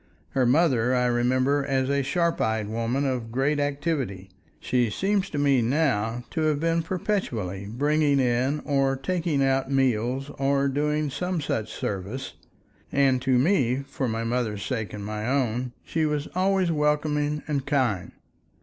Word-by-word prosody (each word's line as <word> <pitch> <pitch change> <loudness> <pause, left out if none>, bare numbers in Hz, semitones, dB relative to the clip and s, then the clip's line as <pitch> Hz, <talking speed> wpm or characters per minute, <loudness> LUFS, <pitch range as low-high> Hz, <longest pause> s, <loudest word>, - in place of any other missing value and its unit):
Her 130 -2 +1
mother 130 -4 +3
I 125 0 +2
remember 130 +4 +2
as 135 -1 0
a 140 0 +1
sharp 170 +4 0
eyed 110 -1 0
woman 115 +5 -1
of 125 -4 -2
great 140 +4 +1
activity; 140 - -2 0.3
she 125 +3 +1
seems 195 - 0
to 150 - -5
me 140 -3 +3
now 120 -3 0
to 160 - -2
have 155 -2 +1
been 165 +1 +1
perpetually 120 - -2
bringing 145 +4 +2
in 130 +4 +1
or 135 -2 +1
taking 155 0 0
out 135 0 +1
meals 135 +1 0
or 140 0 +2
doing 150 +1 0
some 180 +4 -2
such 110 -7 -2
service, 105 +8 -4 0.6
and 135 -2 +3
to 130 -1 +2
me—for 135 -3 +1
my 115 0 -2
mother's 115 -4 -1
sake 110 -5 -3
and 105 -1 -6
my 105 +1 -4
own—she 130 +4 -1
was 150 -1 -2
always 185 -1 +2
welcoming 150 -1 0
and 140 -3 -2
kind. 120 - 0
135 Hz, 150 wpm, -25 LUFS, 120-150 Hz, 0.6 s, mother